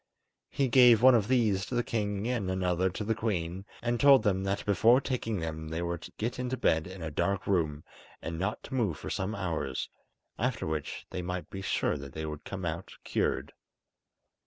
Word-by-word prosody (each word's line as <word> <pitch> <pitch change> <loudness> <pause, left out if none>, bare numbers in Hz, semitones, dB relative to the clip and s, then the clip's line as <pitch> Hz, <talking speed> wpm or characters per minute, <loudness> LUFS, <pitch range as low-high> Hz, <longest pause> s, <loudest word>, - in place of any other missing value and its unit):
He 140 - +1
gave 120 -2 +6
one 130 0 +9
of 110 -4 +3
these 110 -7 +2
to 125 - -4
the 120 - +2
king 105 -3 -2
and 120 -7 -1
another 95 0 +1
to 95 +4 -5
the 110 +2 +1
queen, 95 -4 -2 0.2
and 120 0 0
told 140 -2 +7
them 95 -3 +1
that 100 +1 -1
before 110 +5 +5
taking 115 -6 -2
them 80 -1 -4
they 80 +2 -2
were 85 0 -2
to - - -10
get 120 +4 -2
into 125 +1 -2
bed 80 -9 +2
in 95 -2 -8
a 80 - -4
dark 90 +5 0
room 80 -6 0 0.4
and 80 0 -5
not 95 +4 -2
to - - -9
move 110 - 0
for - - -6
some 95 +3 -2
hours, 80 -9 -2 0.5
after 125 +1 -1
which 80 -2 -4
they 90 - -3
might 90 0 -5
be 95 - -5
sure 90 - 0
that 70 -2 -9
they 80 0 -4
would 75 -1 -6
come 95 -2 -5
out 85 +2 -4
cured. - - -1
95 Hz, 205 wpm, -30 LUFS, 85-115 Hz, 0.5 s, one